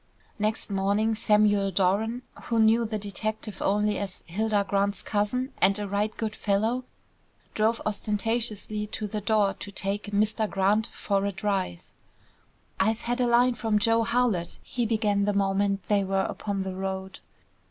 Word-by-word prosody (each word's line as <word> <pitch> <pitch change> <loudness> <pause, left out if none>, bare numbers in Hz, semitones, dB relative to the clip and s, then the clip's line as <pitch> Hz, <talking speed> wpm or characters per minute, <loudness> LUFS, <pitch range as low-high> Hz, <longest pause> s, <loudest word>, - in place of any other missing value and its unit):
Next 215 0 -1
morning 200 +3 +1
Samuel 210 -2 +3
Doran, 205 +6 +1 0.2
who 230 - 0
knew 225 +1 +4
the 215 -1 -2
detective 210 +1 -3
only 210 +1 +1
as 195 -2 -6
"Hilda 205 +3 0
Grant's 200 0 0
cousin 250 +6 -1
and 195 +1 +4
a 205 -1 -3
right 205 +2 0
good 215 -2 -3
fellow," 220 +5 0 0.7
drove 220 +2 +1
ostentatiously 215 0 -2
to 215 - -4
the 210 +1 -3
door 210 -2 +2
to 200 - -7
take 200 +1 -2
"Mr. 210 +1 0
Grant" 205 +3 +2
for 200 -3 -1
a - - -1
drive. 195 - -2 0.9
"I've 220 +4 +2
had 245 +1 -1
a 245 - +3
line 245 +1 +4
from 220 -2 0
Joe 225 +2 +3
Howlett," 230 -7 0
he 240 -2 -2
began 210 -2 +1
the 205 - +1
moment 195 0 +1
they 205 -1 +3
were 195 0 0
upon 200 -2 -3
the 190 -1 -4
road. 190 0 -4
210 Hz, 155 wpm, -27 LUFS, 200-220 Hz, 0.9 s, knew